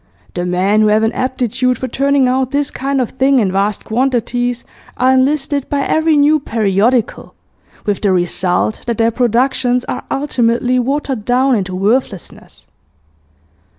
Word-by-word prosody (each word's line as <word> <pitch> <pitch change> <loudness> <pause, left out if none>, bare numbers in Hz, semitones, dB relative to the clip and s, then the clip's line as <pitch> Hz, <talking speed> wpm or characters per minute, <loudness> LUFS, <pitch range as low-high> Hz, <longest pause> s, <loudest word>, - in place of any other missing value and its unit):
The 175 0 -3
men 190 +4 +1
who 215 - +3
have 215 +1 +2
an 220 - +1
aptitude 255 -1 -1
for 260 - -4
turning 275 +1 +1
out 260 0 0
this 285 +1 -1
kind 275 +1 -2
of 250 - -2
thing 265 +1 +2
in 205 -6 +1
vast 200 +2 -1
quantities 245 0 -1 0.3
are 260 +1 +3
enlisted 280 +1 0
by 285 -1 0
every 315 +2 +1
new 295 +2 +4
periodical, 225 -1 0 0.5
with 205 -2 -1
the 200 - +2
result 180 +3 -1
that 235 -2 -1
their 230 0 +2
productions 250 +1 0
are - - -5
ultimately 250 -2 0
watered 265 -2 -2
down 255 +3 +2
into 190 -5 -2
worthlessness.... 205 0 -3
245 Hz, 150 wpm, -15 LUFS, 215-265 Hz, 0.5 s, new